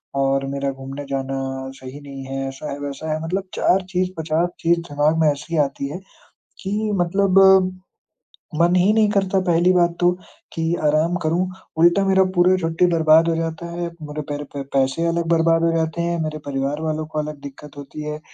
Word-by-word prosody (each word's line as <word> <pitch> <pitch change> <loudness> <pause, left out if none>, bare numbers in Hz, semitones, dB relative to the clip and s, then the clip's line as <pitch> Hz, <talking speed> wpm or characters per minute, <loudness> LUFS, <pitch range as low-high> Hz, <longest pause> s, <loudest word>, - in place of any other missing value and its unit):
और 135 0 +1
मेरा 140 0 -2
घूमने 135 +1 -8
जाना 135 0 -2 0.4
सही 130 +2 -10
नहीं 140 -1 -9
है 135 0 -4
ऐसा 135 +3 -7
है, 140 - -5
वैसा 145 +2 -5
है, 155 - -2
मतलब 185 +4 -2
4 190 - +3
चीज़, 180 0 0
50 160 +2 0
चीज़ 170 +1 +2
दिमाग 145 +2 +1
में 160 - +4
ऐसी 160 +4 -4
आती 140 0 -4
हैं, 165 +5 -6 0.6
कि 210 +2 -2
मतलब 190 +2 +2 1.2
मन 175 +1 +4
ही 185 +3 +4
नहीं 215 -1 +3
करता 195 -2 +1
पहली 175 +1 +4
बात 175 -1 +2
तो 175 0 +5 0.4
कि 165 0 -1
आराम 155 +3 +2
करूँ, 170 +4 +1 0.3
उल्टा 175 +4 +4
मेरा 190 0 +4
पूरा 180 +1 +5
छुट्टी 165 +2 +1
बर्बाद 160 0 +5
हो 165 - +1
जाता 165 0 -3
है। 175 0 -3 0.2
मेरे 150 0 -5
पैर 145 0 -3
पे 140 - -4
पैसे 135 +4 +1
अलग 170 0 -1
बर्बाद 165 0 +3
हो 165 - +3
जाते 160 +1 -1
हैं, 170 0 -1
मेरे 155 0 -4
परिवार 140 +2 -2
वालों 155 0 -2
को 155 -1 -4
अलग 150 -1 -5
दिक्कत 145 +1 -11
होती 145 +2 -8
है, 150 0 -5
160 Hz, 190 wpm, -21 LUFS, 145-175 Hz, 1.2 s, तो